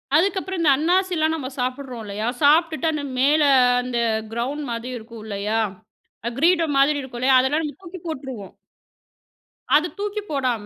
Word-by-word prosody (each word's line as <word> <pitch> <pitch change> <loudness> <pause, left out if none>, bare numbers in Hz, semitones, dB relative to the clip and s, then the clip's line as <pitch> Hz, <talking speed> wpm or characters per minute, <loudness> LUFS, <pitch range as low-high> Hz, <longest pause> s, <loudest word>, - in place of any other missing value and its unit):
அதுக்கப்புறம் 380 +1 +1
இந்த 310 - +4
அண்ணாசில 350 0 +2
நம்ம 270 -5 -5
சாப்பிட்றோம் 255 -1 -3
இல்லயா, 210 +3 -4
சாப்ட்டுட்டு 315 +2 +3
அந்த 300 -2 -3 0.2
மேல 295 +3 +4 0.4
அந்த 250 -1 -3 0.4
கிரவுண்ட் 270 +6 -3
மாதி 230 +2 -4
இருக்கும் 225 -1 -11
இல்லயா, 210 +2 -2 0.8
கிரீடம் 330 -3 +3
மாதிரி 285 +2 +4
இருக்கும் 245 -2 -8
இல்லயா, 260 0 +5
அதெல்லாம் 290 +5 +1
நம்ம 295 - -5
தூக்கி 360 +1 -9
போட்ருவோம். 260 -9 -6 1.2
அத 320 +3 +3
தூக்கி 415 +1 -3
போடாம 250 -7 -1
285 Hz, 140 wpm, -22 LUFS, 245-325 Hz, 1.2 s, இல்லயா